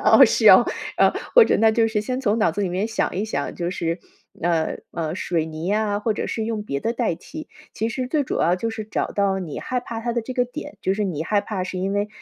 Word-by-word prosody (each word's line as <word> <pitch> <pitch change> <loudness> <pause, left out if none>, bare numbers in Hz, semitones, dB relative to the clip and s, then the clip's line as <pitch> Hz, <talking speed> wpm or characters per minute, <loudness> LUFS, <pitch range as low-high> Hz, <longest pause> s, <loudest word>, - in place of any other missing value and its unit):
哦， - - +8
是 - - +4
哦。 - - +9 0.3
呃， - - +5 0.2
或 480 -2 +9
者 - - +2
那 220 0 +5
就 225 0 +3
是 220 -1 0
先 255 +5 -3
从 215 -1 +2
脑 215 -6 +3
子 200 +5 -3
里 185 - -1
面 190 +5 -1
想 220 - -1
一 195 - 0
想， 145 -10 -3
就 175 0 -2
是， 170 -1 -2 0.4
呃， 165 -2 0
呃， 160 -1 -3
水 170 -3 -1
泥 160 +3 -4
啊， 210 -1 +1
或 215 +1 0
者 - - -3
是 220 - -2
用 220 -2 -2
别 140 -9 -3
的 230 - -1
代 230 -8 0
替。 310 - -10 0.3
其 225 - -1
实 255 +2 -3
最 295 0 +1
主 - - -2
要 175 +2 +3
就 225 +4 -2
是 225 -1 -5
找 215 - -2
到 200 -1 +1
你 170 -6 -5
害 250 -1 -2
怕 230 -2 -6
它 235 +1 -2
的 235 - 0
这 255 - -6
个 250 0 +1
点， 295 +3 -8
就 190 +1 0
是 210 - -1
你 160 -6 -2
害 205 +5 +1
怕 195 -4 -3
是 185 0 -5
因 195 +2 -1
为 205 +1 0
210 Hz, 285 characters per minute, -23 LUFS, 180-230 Hz, 0.4 s, 哦